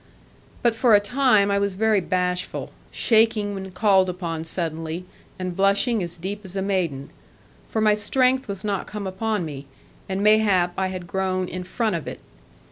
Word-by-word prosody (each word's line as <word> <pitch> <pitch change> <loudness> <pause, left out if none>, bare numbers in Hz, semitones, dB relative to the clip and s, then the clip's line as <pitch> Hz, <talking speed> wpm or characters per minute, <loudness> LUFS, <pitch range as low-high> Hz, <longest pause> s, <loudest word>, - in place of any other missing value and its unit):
But 235 -2 +3
for 225 -1 +5
a - - +7
time 215 -2 +3
I 200 - +2
was 200 -1 -1
very 215 0 +2
bashful, 180 0 -2 0.2
shaking 220 -2 +2
when 190 -1 -6
called 190 -1 +3
upon 170 -3 -4
suddenly, 165 0 -3 0.3
and 185 -1 -4
blushing 200 +4 +2
as 175 -1 -5
deep 195 +4 -5
as 190 -1 -8
a 195 - -1
maiden; 170 -9 -2 0.6
for 220 - -1
my 215 -1 +5
strength 255 +5 +2
was 195 -2 -5
not 200 -3 -2
come 210 -1 -6
upon 195 0 -2
me, 140 -3 -8 0.4
and 190 +1 -1
mayhap 205 -5 +4
I 190 - 0
had 185 -1 -6
grown 185 0 -1
in 180 0 -5
front 215 +2 -1
of 165 - -5
it. - - -6
195 Hz, 175 wpm, -23 LUFS, 180-210 Hz, 0.6 s, a